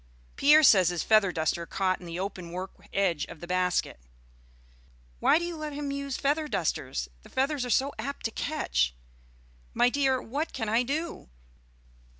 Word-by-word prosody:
Pierre 300 +2 +6
says 190 - +7
his 175 -1 -2
feather 215 -4 +4
duster 165 +1 -1
caught 185 -1 0
in 175 - -11
the 170 +1 -5
open 185 -3 -5
work 185 +2 -5 0.2
edge 180 -6 +1
of - - -11
the 175 - -8
basket." 180 - 0 1.2
"Why - - +5
do 345 - -2
you 345 -1 -4
let 305 -1 -5
him 285 -1 -4
use 280 -1 -3
feather 300 +2 0
dusters? 150 - -2
The - - -16
feathers 270 0 0
are - - -5
so 270 +4 +2
apt 280 +5 -5
to 225 - 0
catch." - - -1 0.8
"My 245 - +4
dear, 270 -1 +1
what 285 +7 -4
can 225 -4 -3
I 225 +3 +3
do? 300 - -4
225 Hz, 170 wpm, -28 LUFS, 180-280 Hz, 1.2 s, says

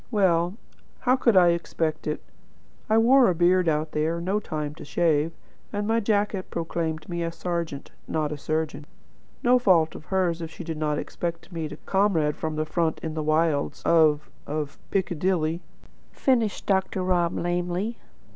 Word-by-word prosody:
Well, 180 -5 +2 0.5
how 255 0 +4
could 235 -6 +3
I 175 -1 +7
expect 165 -2 -1
it? 150 - -2 0.7
I 220 - +4
wore 245 +2 +6
a 180 - +1
beard 175 +1 +4
out 155 0 0
there; 160 +2 0
no 190 +5 0
time 150 -6 -4
to - - -11
shave; 155 0 +1 0.4
and 205 0 -2
my 225 +1 +2
jacket 205 -3 0
proclaimed 165 -2 -3
me 170 -1 -3
a 165 0 -1
serjeant, 170 -4 -4 0.2
not 155 -2 -1
a 150 - -4
surgeon. 155 -1 -2 0.6
No 250 +1 +5
fault 175 -9 +4
of 155 - -10
hers 180 -3 0
if 165 - -4
she 175 - -9
did 160 -2 -5
not 150 -1 0
expect 170 -1 -4
to 190 - -16
meet 160 -3 -4
a - - -9
comrade 180 -7 +1
from 155 -1 -3
the 155 0 -1
front 160 0 0
in 160 - -3
the 155 - -2
wilds 155 -1 +1
of 155 -3 +3 0.2
of 150 -1 -4
Piccadilly," 175 -3 0 0.5
finished 235 -6 +1
Dr. 190 -1 +1
Rob 175 -2 +1
lamely. 175 +5 -2
170 Hz, 170 wpm, -25 LUFS, 155-190 Hz, 0.7 s, I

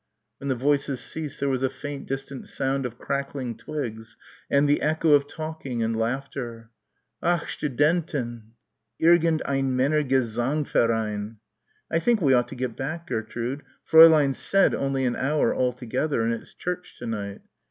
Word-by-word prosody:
When 140 - -6
the 135 - +1
voices 140 0 +1
ceased 155 0 -5
there 140 - 0
was 130 -1 0
a 130 - +2
faint 140 +1 -7
distant 135 0 -5
sound 135 -1 -1
of 120 0 -12
crackling 140 -3 -3
twigs 115 -7 -6 0.3
and 140 +1 +3
the 145 - +2
echo 160 +1 +2
of 140 -1 +4
talking 155 -7 -4
and 115 0 0
laughter. 120 -1 -4 0.5
"Ach 175 -1 +2
Studenten!" 140 -6 -1 0.5
"Irgend 165 -1 +4
ein 135 -2 0
Männergesangverein." 120 -5 +1 0.6
"I 165 - +2
think 235 +5 +2
we 140 -7 +3
ought 120 -1 +3
to - - -9
get 125 -2 -3
back, 160 +5 -4
Gertrude. 120 +1 -3 0.3
Fräulein 160 -3 +8
said 195 +7 +3
only 135 -1 0
an 120 -1 0
hour 150 +3 +1
altogether 125 +1 -1
and 115 +1 +1
it's 115 - -8
church 180 0 -5
to 120 - -8
night." 100 -3 -4
135 Hz, 150 wpm, -25 LUFS, 120-150 Hz, 0.6 s, Fräulein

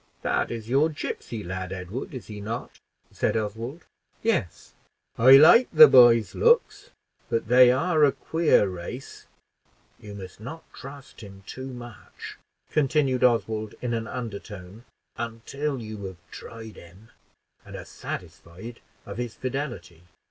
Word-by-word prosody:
"That - - 0
is 115 -2 -6
your 140 +6 +3
gipsy 120 -7 -6
lad, 95 +1 -5
Edward, 95 +6 -6
is 125 - -8
he 105 -1 -9
not?" 115 +4 -6 0.3
said - - -1
Oswald. 115 +8 -5 0.4
"Yes." 195 - -2 0.4
"I 130 +3 +7
like 175 - +7
the 230 - +10
boy's 120 -3 +6
looks; 475 +1 +2 0.4
but 115 -1 -2
they 125 0 +7
are 155 +4 +2
a 145 - +6
queer 160 -10 +2
race. 95 +8 -8 0.7
You 105 -1 -10
must 95 -2 -10
not 135 +9 -9
trust 140 0 -12
him 100 -2 -12
too 130 +5 -8
much," 120 -6 -11 0.3
continued 135 -3 +1
Oswald, 110 -3 +1
in 125 -1 -3
an 115 -1 -3
undertone, 105 -2 -8 0.3
"until 120 +5 -4
you 110 -2 -8
have 95 -2 -8
tried 115 -1 -10
him, 95 +7 -16 0.5
and - - -11
are - - -8
satisfied 95 +8 -9 0.3
of 100 +1 -8
his 120 -2 -4
fidelity. 130 - -5
115 Hz, 135 wpm, -25 LUFS, 105-135 Hz, 0.7 s, the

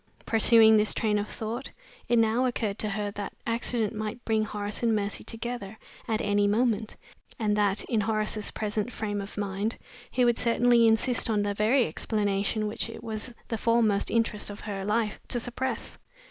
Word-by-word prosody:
Pursuing 225 0 +6
this 210 0 +2
train 210 -2 +1
of 205 - -3
thought, 230 +4 -5 0.4
it 240 - +4
now 230 +3 +3
occurred 220 -4 -2
to 215 - -1
her 205 0 -2
that 205 -1 -6
accident 230 -1 0
might 215 +2 -5
bring 220 -1 +2
Horace 205 -1 -4
and 230 -2 +2
Mercy 205 -1 -2
together 225 -3 -5 0.3
at 220 -1 0
any 205 0 +2
moment, 220 0 +1 0.4
and 210 -2 +1
that, 205 -1 +2
in 225 -3 0
Horace's 215 0 -1
present 215 +2 -3
frame 205 -3 -3
of 200 +1 -9
mind, 205 +2 -2 0.3
he 250 -1 +2
would 240 -1 +2
certainly 235 0 +4
insist 230 +2 +2
on 210 -2 +2
the 205 0 -1
very 225 +5 +3
explanation 205 +4 -1
which 215 +2 -3
it 230 - -9
was 220 +2 -5 0.2
the 225 - -2
foremost 225 -3 +2
interest 225 -3 0
of 205 - -8
her 200 -2 -4
life 210 +1 0
to 245 - -1
suppress. 255 +2 -4
215 Hz, 175 wpm, -27 LUFS, 205-230 Hz, 0.4 s, Pursuing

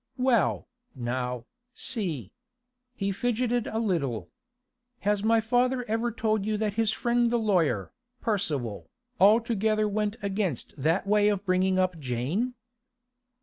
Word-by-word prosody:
'Well, 250 -4 +2 0.3
now, 125 -1 -3 0.3
see.' 170 - -2 0.6
He 200 -3 -1
fidgeted 245 +2 0
a 220 - -3
little. 165 - -1 0.7
'Has 205 0 +1
my 225 +1 +4
father 245 +3 +1
ever 225 +2 0
told 215 -2 0
you 215 +1 0
that 210 -1 -1
his 220 0 +2
friend 240 +1 +1
the 240 - +2
lawyer, 175 - +1 0.3
Percival, 150 - -2 0.3
altogether 215 +1 +4
went 210 0 -1
against 195 - -2
that 160 +8 +1
way 210 +1 +4
of 205 -1 -1
bringing 185 0 +2
up 185 -3 +1
Jane? 145 - -2
205 Hz, 125 wpm, -27 LUFS, 170-225 Hz, 0.7 s, my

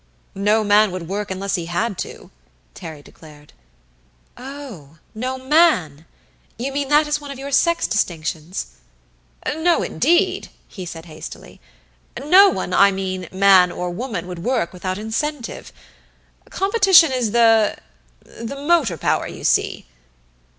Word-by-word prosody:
"No 210 +3 +1
man 210 +1 +4
would 180 -2 -6
work 205 +3 -4
unless 195 +1 -3
he 175 -3 -2
had 200 +5 -2
to," - - -8 0.4
Terry 155 - -10
declared. 150 -2 -17 0.8
"Oh, 250 - -10 0.2
no 255 +4 -4
man! 260 - +2 0.5
You 255 +4 -3
mean 280 0 -2
that 295 +1 +4
is 295 0 -2
one 290 - -9
of 275 - -7
your 275 +1 -7
sex 335 +5 +2
distinctions?" 170 -3 -3 0.7
"No, 330 +3 +1
indeed!" 345 +1 +1 0.2
he 185 -4 -9
said 165 -1 -8
hastily. 155 -2 -11 0.6
"No 365 +10 +6
one, 185 - -4
I 200 - +6
mean, 185 -2 -4
man 190 -2 +5
or 180 0 -4
woman, 200 -3 -5
would 180 -1 -7
work 235 -8 -1
without 185 +1 -4
incentive. 235 +5 -4 0.8
Competition 385 -6 +4
is 250 -4 0
the 225 -1 +3 0.5
the 230 +4 -8
motor 285 - +1
power, - - 0
you - - -10
see." - - 0
215 Hz, 135 wpm, -20 LUFS, 180-280 Hz, 0.8 s, No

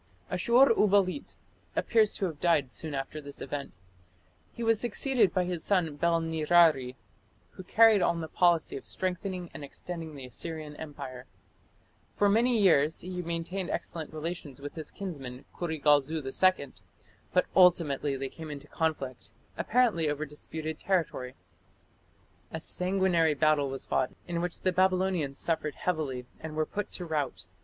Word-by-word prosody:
Ashur 250 +2 +5
uballit 205 +3 +2 0.4
appears 220 -3 +3
to 195 - -1
have 160 -5 -5
died 150 -7 +2
soon 155 0 -2
after 135 +3 -4
this 140 -1 -8
event. 145 -1 -5 0.8
He 235 - -6
was 225 -1 +3
succeeded 240 -1 +2
by 185 - +1
his 175 -2 -4
son 175 -7 +1
Bel 170 +1 +2
nirari, 160 -5 +3 0.6
who - - -10
carried 220 +1 +5
on 170 -1 +2
the 160 - -4
policy 170 -2 +2
of - - -9
strengthening 185 -1 -3
and - - -8
extending 160 +2 -7
the 135 -2 -8
Assyrian 155 +4 -6
empire. 130 -5 -8 0.8
For 205 - +2
many 235 +4 +3
years 160 -7 +4
he 180 0 -5
maintained 170 +2 -3
excellent 160 -3 -4
relations 155 -3 -5
with 145 +1 -7
his 160 -3 -6
kinsman 140 -10 -7
Kurigalzu 155 -2 +1
II, 140 0 +2 0.6
but 180 - +3
ultimately 150 -6 +4
they 135 0 -3
came 160 +2 -9
into 145 -1 -7
conflict 150 -6 -3 0.3
apparently 215 -10 +2
over 150 +1 -2
disputed 155 +1 -6
territory. 160 -9 -1 1.1
A 160 - -5
sanguinary 180 -3 +1
battle 145 -1 +3
was 135 0 -5
fought, 130 - 0
in 170 -1 -2
which 175 -1 -3
the 185 - +2
Babylonians 185 -6 +1
suffered 155 -2 -1
heavily 145 -8 -2
and 160 -1 -7
were 155 0 +1
put 205 +4 -4
to 180 - -2
rout. 150 -5 -2
165 Hz, 150 wpm, -29 LUFS, 145-185 Hz, 1.1 s, Ashur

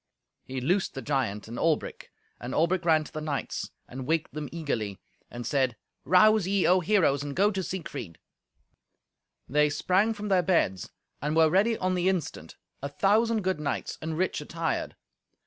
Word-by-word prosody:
He 130 0 -5
loosed 180 +8 0
the 135 - -5
giant 115 -7 -1
and 115 +2 -6
Albric, 160 -2 -1 0.3
and 120 - -5
Albric 170 +2 +1
ran 160 -2 +4
to - - -12
the 155 - -4
knights, 150 -3 -3 0.2
and 130 +1 -7
waked 160 -3 0
them 150 -1 -5
eagerly, 115 - -3 0.3
and 120 0 -7
said, 130 -3 +1 0.3
"Rouse 205 +4 +5
ye, 195 -1 +2
O 185 +1 +5
heroes, 165 -7 +2
and 145 -1 -5
go 205 +3 +3
to 190 -2 -2
Siegfried." 140 - -6 1.3
They 150 +2 +3
sprang 190 +8 +2
from 210 0 -5
their 190 -2 +4
beds 160 - +1 0.3
and 150 +3 -1
were 160 -1 +5
ready 215 +5 +3
on 185 0 0
the 180 +1 +2
instant, 160 - -3 0.3
a 140 - -3
thousand 215 +7 +2
good 185 -3 0
knights 145 -3 -3
and 160 0 -3
rich 185 -3 0
attired. 165 +1 -3
160 Hz, 170 wpm, -28 LUFS, 140-185 Hz, 1.3 s, Rouse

